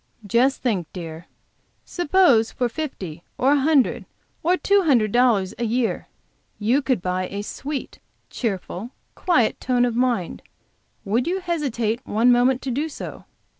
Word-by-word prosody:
Just 245 Hz, +7 st, +2 dB
think, 200 Hz, -10 st, 0 dB
dear, 165 Hz, -1 st, -8 dB, 0.6 s
suppose 345 Hz, -10 st, +3 dB
for 250 Hz, -, -1 dB
fifty 200 Hz, -, -6 dB, 0.2 s
or 265 Hz, +2 st, +3 dB
a 290 Hz, -, +4 dB
hundred 285 Hz, -1 st, +2 dB, 0.4 s
or 355 Hz, +3 st, +2 dB
two 400 Hz, +1 st, +3 dB
hundred 245 Hz, -, +3 dB
dollars 230 Hz, -6 st, +3 dB
a -, -, -1 dB
year 235 Hz, +1 st, -1 dB, 0.5 s
you 235 Hz, +7 st, +2 dB
could 255 Hz, -9 st, -1 dB
buy 185 Hz, 0 st, -1 dB
a 200 Hz, +2 st, -5 dB
sweet, 275 Hz, +6 st, -6 dB, 0.3 s
cheerful, 205 Hz, -1 st, -4 dB, 0.2 s
quiet 325 Hz, -12 st, +1 dB
tone 245 Hz, -1 st, +2 dB
of 240 Hz, -2 st, -1 dB
mind, 240 Hz, -8 st, 0 dB, 0.6 s
would 230 Hz, +7 st, 0 dB
you 370 Hz, +2 st, 0 dB
hesitate 260 Hz, -, -2 dB
one 230 Hz, +4 st, +3 dB
moment 245 Hz, +1 st, +3 dB
to 265 Hz, -, -2 dB
do 295 Hz, +6 st, -1 dB
so? -, -, -8 dB
245 Hz, 145 wpm, -23 LUFS, 215-280 Hz, 0.6 s, a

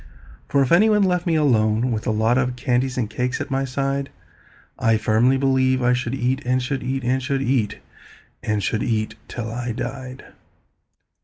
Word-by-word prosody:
For 140 Hz, -1 st, +3 dB
if 130 Hz, -, -2 dB
any 200 Hz, +6 st, +6 dB
one 210 Hz, -1 st, +4 dB
left 180 Hz, -2 st, 0 dB
me 165 Hz, -, +2 dB
alone 120 Hz, -5 st, +2 dB
with 110 Hz, -1 st, -3 dB
a -, -, +2 dB
lot 110 Hz, +2 st, +2 dB
Of 125 Hz, -1 st, -1 dB
candies 125 Hz, +1 st, 0 dB
and 120 Hz, -4 st, 0 dB
cakes 125 Hz, +3 st, -2 dB
at -, -, -5 dB
my 135 Hz, 0 st, 0 dB
side, 135 Hz, +1 st, -2 dB, 0.7 s
I 115 Hz, -1 st, +3 dB
firmly 115 Hz, +5 st, +3 dB
believe 130 Hz, -1 st, +2 dB
I 125 Hz, 0 st, +4 dB
should 125 Hz, 0 st, -2 dB
eat, 130 Hz, 0 st, 0 dB
and 125 Hz, +1 st, +1 dB
should 130 Hz, +1 st, -3 dB
eat, 130 Hz, +1 st, -3 dB
And 130 Hz, +2 st, +1 dB
should 135 Hz, 0 st, -1 dB
eat, 120 Hz, -5 st, 0 dB, 0.6 s
and 105 Hz, -2 st, -1 dB
should 110 Hz, +2 st, -1 dB
eat, 110 Hz, -3 st, -1 dB
till 115 Hz, -2 st, -5 dB
I 120 Hz, 0 st, -3 dB
died. 130 Hz, +2 st, -6 dB
125 Hz, 185 wpm, -22 LUFS, 120-135 Hz, 0.7 s, any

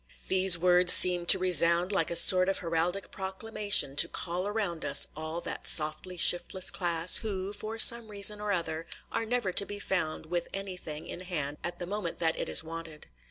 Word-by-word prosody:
These 185 Hz, -2 st, +5 dB
words 180 Hz, +1 st, +2 dB
seemed 180 Hz, -1 st, +5 dB
to -, -, +10 dB
resound 175 Hz, 0 st, +3 dB
like 195 Hz, -, -1 dB
a 170 Hz, -, -5 dB
sort 185 Hz, +2 st, +5 dB
of 195 Hz, -, -2 dB
heraldic 175 Hz, +2 st, -4 dB
proclamation 195 Hz, -5 st, 0 dB
to 170 Hz, -, +4 dB
call 180 Hz, +3 st, -5 dB
around 205 Hz, -6 st, -5 dB
us 140 Hz, -, +2 dB
all 160 Hz, +2 st, -7 dB
that -, -, -7 dB
softly 155 Hz, +4 st, -1 dB
shiftless 175 Hz, +2 st, +2 dB
class, 170 Hz, -1 st, 0 dB
who, 200 Hz, -3 st, -6 dB
for 215 Hz, +2 st, -7 dB
some 235 Hz, 0 st, +5 dB
reason 205 Hz, 0 st, -1 dB
or 210 Hz, -1 st, -4 dB
other, 165 Hz, -3 st, -5 dB, 0.2 s
are 225 Hz, -, -4 dB
never 240 Hz, -5 st, -2 dB
to 190 Hz, -, +2 dB
be 205 Hz, +1 st, -9 dB
found 175 Hz, -6 st, -5 dB
with 175 Hz, +1 st, -5 dB
anything 180 Hz, -6 st, -8 dB
in -, -, -9 dB
hand 150 Hz, -6 st, -7 dB
at 175 Hz, 0 st, -7 dB
the 175 Hz, -, -7 dB
moment 195 Hz, -2 st, -6 dB
that 160 Hz, -1 st, -2 dB
it -, -, -6 dB
is -, -, 0 dB
wanted. 165 Hz, -1 st, -11 dB
180 Hz, 190 wpm, -27 LUFS, 165-195 Hz, 0.2 s, to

